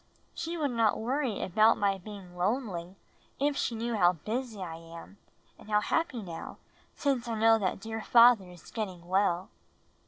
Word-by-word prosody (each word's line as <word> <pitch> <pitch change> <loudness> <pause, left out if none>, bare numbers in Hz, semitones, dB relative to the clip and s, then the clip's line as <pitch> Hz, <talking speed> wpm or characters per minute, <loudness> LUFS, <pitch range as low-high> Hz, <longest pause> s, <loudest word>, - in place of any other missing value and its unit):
She 335 +1 -4
would 290 -4 0
not 225 -3 +2
worry 250 0 -1
about 215 +5 +4
my 195 -1 +1
being 190 -2 -10
lonely 185 -2 -2 0.4
if 285 +1 +1
she 235 - -1
knew 230 +1 -2
how 180 -3 +4
busy 220 - -4
I 170 -3 -5
am, 165 +4 -12 0.4
and - - -14
how 210 -1 +4
happy 255 -1 -1
now 170 -3 -8 0.4
since 265 -4 0
I 230 - -2
know 225 0 +5
that 190 -2 -1
dear 220 +2 -5
father 235 -5 +6
is 175 -2 -14
getting 185 -6 -5
well." 185 0 +1
215 Hz, 165 wpm, -30 LUFS, 185-235 Hz, 0.4 s, father